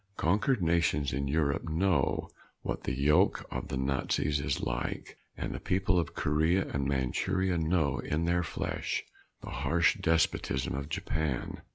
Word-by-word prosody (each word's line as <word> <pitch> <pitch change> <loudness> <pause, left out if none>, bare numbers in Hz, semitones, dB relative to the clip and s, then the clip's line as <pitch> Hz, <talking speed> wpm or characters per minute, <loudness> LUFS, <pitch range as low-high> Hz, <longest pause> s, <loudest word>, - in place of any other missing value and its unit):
Conquered 105 - +2
nations 80 -5 +2
in 70 +2 -1
Europe 75 +2 0
know 80 -3 +1 0.4
what - - -3
the - - 0
yoke 75 +2 +3
of - - -4
the 65 - -3
Nazis 70 +2 0
is 70 - -1
like. 60 0 -3 0.2
And - - -3
the - - -5
people 95 0 +1
of 85 - -3
Korea 80 +6 +2
and - - -9
of 70 - +1
Manchuria 90 +7 0
know 80 -3 +1
in 80 +3 -1
their 85 +1 +2
flesh 85 - -3 0.4
the - - -8
harsh 85 0 +2
despotism 80 -5 +1
of 70 +2 -4
Japan. 80 -4 -2
80 Hz, 155 wpm, -30 LUFS, 70-85 Hz, 0.4 s, yoke